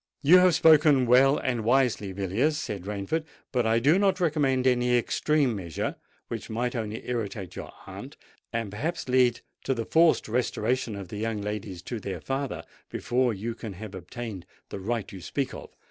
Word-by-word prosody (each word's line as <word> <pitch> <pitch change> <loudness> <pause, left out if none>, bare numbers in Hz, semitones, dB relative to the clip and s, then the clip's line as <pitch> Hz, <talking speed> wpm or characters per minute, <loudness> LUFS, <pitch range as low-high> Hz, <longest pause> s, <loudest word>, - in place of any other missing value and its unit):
"You 175 +6 +8
have 180 -2 +5
spoken 150 -4 +6
well 130 +4 +5
and 120 -4 -1
wisely, 120 -4 +2
Villiers," 100 - 0
said 100 - -5
Rainford; 105 +11 -2 0.3
"but 125 -4 +1
I 110 +1 +3
do 145 +10 +4
not 195 -2 +2
recommend 145 -6 +1
any 125 -1 +3
extreme 140 +1 +1
measure, 85 -6 -3 0.3
which - - -6
might 120 +3 -2
only 110 -2 -4
irritate 105 -6 -4
your - - -7
aunt, - - -9 0.3
and 115 -4 -3
perhaps 140 +12 -3
lead 125 -2 +3 0.2
to 135 - 0
the 115 -1 -3
forced 165 0 +4
restoration 120 0 -1
of 100 -3 -7
the 105 - -6
young 110 0 -2
ladies 100 -3 -5
to 120 - -5
their 100 -2 -5
father 135 0 -3 0.3
before 125 0 0
you 110 +3 -4
can 110 -3 -7
have 105 +2 -9
obtained 95 +1 -7 0.2
the - - -6
right 110 +1 -3
you 95 - -9
speak 135 - -3
of. - - -9
120 Hz, 175 wpm, -27 LUFS, 105-135 Hz, 0.3 s, You